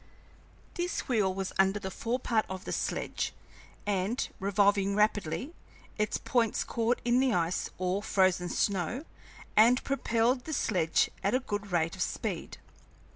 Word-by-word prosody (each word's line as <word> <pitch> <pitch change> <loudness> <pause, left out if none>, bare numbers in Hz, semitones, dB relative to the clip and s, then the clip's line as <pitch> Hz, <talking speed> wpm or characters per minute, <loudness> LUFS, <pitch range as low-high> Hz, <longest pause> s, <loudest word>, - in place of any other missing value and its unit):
This 355 0 -2
wheel 215 -7 +2
was 190 0 -4
under 195 +1 +4
the 190 -2 -5
fore 235 +6 -2
part 230 -3 0
of 190 0 -6
the - - -4
sledge, - - -2 0.5
and, 205 +4 0
revolving 200 0 +2
rapidly, 210 - 0 0.5
its 210 0 +1
points 230 -3 +1
caught 235 +1 0
in 240 +1 +4
the 260 -3 +3
ice 170 0 0
or 185 +2 0
frozen 185 -3 +2
snow 200 - -1 0.5
and 235 +4 +6
propelled 245 -2 +1
the 315 - -4
sledge 175 - +1
at 200 +6 +2
a - - +3
good 205 -5 -4
rate 165 -1 +1
of - - -7
speed. - - -3
205 Hz, 145 wpm, -30 LUFS, 190-240 Hz, 0.5 s, and